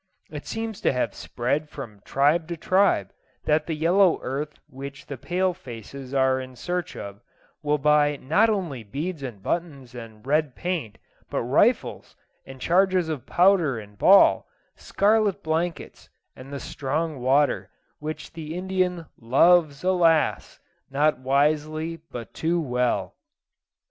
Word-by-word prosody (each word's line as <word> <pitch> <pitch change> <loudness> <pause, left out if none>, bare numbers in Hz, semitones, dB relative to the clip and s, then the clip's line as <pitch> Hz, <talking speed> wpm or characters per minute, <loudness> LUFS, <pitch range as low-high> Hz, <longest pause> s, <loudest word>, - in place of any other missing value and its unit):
It 150 -2 -8
seems 225 -1 -4
to - - +3
have 125 -5 -1
spread 140 +5 -2
from 110 -9 -9
tribe 150 +4 +2
to 170 -1 -5
tribe 185 - +2 0.3
that 150 0 +2
the 160 - -2
yellow 175 +3 +3
earth 145 +3 -4
which 140 +1 -9
the 140 - -6
pale 180 +7 -1
faces 130 - -10
are 130 -1 +2
in 130 0 -10
search 175 +7 -4
of 100 +1 -8 0.4
will 150 -1 +1
buy 150 0 +3
not 165 +13 +2
only 175 - -2
beads 150 - -5
and 115 -8 -7
buttons 140 -8 -3
and 115 -2 -11
red 150 -2 +1
paint, 175 - -3 0.3
but - - -2
rifles, - - +1 0.3
and 135 0 -10
charges 185 +2 +2
of 140 -5 -5
powder 175 -8 +3
and 105 -2 -11
ball, 195 +1 +6 0.3
scarlet 205 -1 +1
blankets, 160 +1 -3 0.3
and 130 +2 -11
the 140 - -5
"strong 150 +3 -3
water," 140 +3 +2 0.3
which 155 +1 -6
the 160 -1 -6
Indian 180 -2 -1
"loves, 145 +5 +4
alas! 170 -4 +2 0.3
not 145 +1 +2
wisely 155 +4 0
but 120 -2 -8
too 170 +2 0
well." 125 -5 -1
150 Hz, 140 wpm, -25 LUFS, 130-175 Hz, 0.4 s, ball